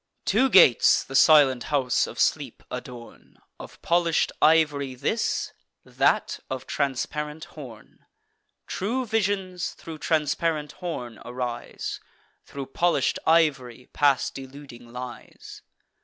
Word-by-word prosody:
Two 265 - +3
gates 170 - +6
the - - -11
silent 135 -4 +5
house 135 -4 +1
of - - -10
Sleep - - -1
adorn; 120 -2 -10 0.2
Of - - -11
polish'd 170 -1 +1
ivory 145 -4 +3
this, 125 - -2 0.3
that - - +1
of 130 0 -5
transparent 150 +3 -3
horn: 125 -8 -13 0.6
True 245 +7 -2
visions 195 -5 -2
thro' 160 -2 -10
transparent 155 -1 -1
horn 125 - -6
arise; 125 -1 -5 0.5
Thro' 140 -1 -6
polish'd 140 -1 0
ivory 135 -7 +1
pass 140 -3 +2
deluding 135 -3 -11
lies. 125 0 -10
145 Hz, 105 wpm, -25 LUFS, 125-165 Hz, 0.6 s, gates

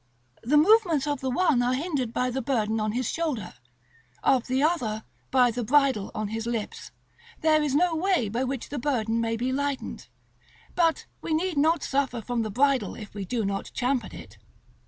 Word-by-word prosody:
The 275 +6 +2
movements 345 -4 +4
of 290 -2 -1
the 265 - -1
one 290 -2 +2
are 250 +1 +1
hindered 280 -5 -2
by 250 +1 0
the 265 +2 -2
burden 225 -4 0
on 215 0 -1
his 245 0 -1
shoulder; 290 - -2 0.7
of 255 -3 +3
the 260 +2 +1
other, 235 -10 0 0.3
by 250 -2 +4
the 240 +1 -3
bridle 265 -4 +2
on 215 -1 -2
his 225 +1 -4
lips: 230 -3 -4 0.5
there 310 -1 +4
is 290 -2 0
no 340 +2 +3
way 350 - +1
by 230 +5 -1
which 265 -1 -4
the 285 - -4
burden 230 -4 0
may 230 0 -1
be 250 +3 -1
lightened; 285 0 -3 0.7
but 330 -2 +1 0.2
we 320 - -1
need 350 +1 -1
not 315 +4 +2
suffer 265 -3 0
from 235 +1 -2
the 220 - -2
bridle 270 +5 +1
if 210 -2 -10
we 200 -1 -5
do 225 +2 -1
not 195 0 -3
champ 255 0 +1
at - - -9
it. - - -12
260 Hz, 195 wpm, -26 LUFS, 230-295 Hz, 0.7 s, movements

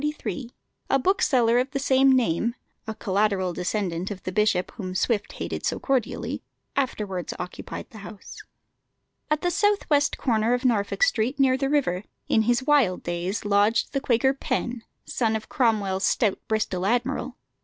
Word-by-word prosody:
A 270 - +4
bookseller 255 -7 +3
of 255 +2 0
the 275 - -3
same 270 0 +4
name 235 -2 +1 0.3
a 220 - -4
collateral 195 -3 0
descendant 180 -1 -2
of 195 -3 -7
the 185 - -3
bishop 210 -3 +1
whom 185 -5 -6
Swift 210 0 0
hated - - -5
so - - 0
cordially 260 -5 -1 0.3
afterwards 210 -9 -2
occupied 180 0 -7
the 220 - -11
house. 205 0 -10 0.9
At 305 0 +1
the 355 - +2
south 410 +2 +1
west 290 0 +3
corner 230 -1 +1
of 250 +2 -4
Norfolk 225 - +1
Street, 260 - +1
near 265 -1 +4
the 270 +1 -1
river, 210 -11 +1 0.2
in 220 - +3
his 240 +2 +2
wild 265 -10 +3
days 175 +5 -3
lodged 205 +3 +2
the 275 - 0
Quaker 265 +1 +2
Penn, 250 -3 -3 0.2
son 225 -3 0
of 220 - -5
Cromwell's 205 -6 +1
stout 215 -6 +1
Bristol 195 -4 -1
admiral. 245 +2 -1
230 Hz, 155 wpm, -25 LUFS, 200-265 Hz, 0.9 s, A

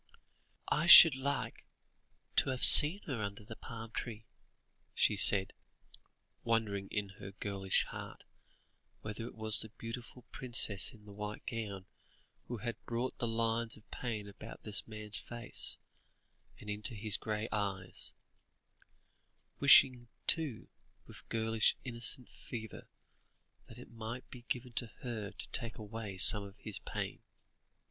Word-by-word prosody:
"I 155 +3 -1
should 165 -3 +10
like 130 -3 -5 0.7
to - - +2
have 130 -1 +3
seen 160 +7 +12
her 130 -7 -6
under 100 0 -7
the 110 +2 -12
palm 115 0 -11
tree," 115 -3 -8 0.7
she 105 - +1
said, 95 0 +4 0.9
wondering 110 -4 -2
in 105 -1 -5
her 100 0 -11
girlish 100 -1 -1
heart, - - -11 0.8
whether 110 +2 -8
it - - -13
was 110 -1 -1
the 110 - -8
beautiful 120 +3 -11
princess 115 -7 0
in 105 -2 -20
the 105 - -14
white 105 +1 -9
gown, 105 -5 -7 0.6
who 120 - -7
had 120 +2 -8
brought 120 +2 -5
the 120 - -2
lines 115 0 -2
of 105 - -24
pain 110 -4 -7
about 105 +2 -13
this 105 -3 -1
man's 105 -1 -2
face, 120 0 -3 0.8
and 105 - -14
into 105 +3 -6
his 105 0 -1
grey 105 +1 -5
eyes; 95 -3 -6 1.5
wishing, 125 -2 +4 0.2
too, 150 -9 -2 0.4
with - - -17
girlish 110 -1 -1
innocent 120 0 -7
fervour, 110 -3 -11 0.8
that - - -14
it - - -15
might 115 +2 -9
be 125 - -12
given 125 -1 -5
to 120 +1 -3 0.2
her 110 -5 -6
to - - -10
take 115 -3 -4
away 110 -2 -9
some 105 +3 +4
of 100 0 -14
his 105 -1 -7
pain. - - -7
110 Hz, 140 wpm, -31 LUFS, 105-120 Hz, 1.5 s, seen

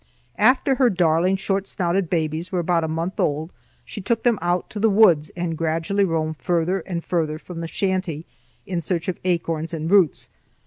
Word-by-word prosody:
After 255 +5 +4
her 255 -2 +3
darling 175 -1 +2
short 195 0 -1
snouted 175 0 -1
babies 160 0 -2
were 185 - -1
about 170 -1 +1
a - - -1
month 165 +4 -3
old, 155 +3 0 0.3
she 205 - -7
took 225 +3 -1
them 235 -4 +2
out 175 +1 0
to 210 - -5
the 225 +2 +3
woods 190 -8 +4
and 175 -2 -2
gradually 165 +5 0
roamed 160 -3 -1
farther 175 +2 0
and 170 -3 -3
farther 160 -3 -1
from 170 +1 -9
the 165 - -4
shanty 185 -4 -2 0.4
in 180 -2 -3
search 170 0 -2
of 180 - -4
acorns 165 -2 -1
and 160 +2 -3
roots. 190 -7 +3
175 Hz, 185 wpm, -22 LUFS, 160-195 Hz, 0.4 s, After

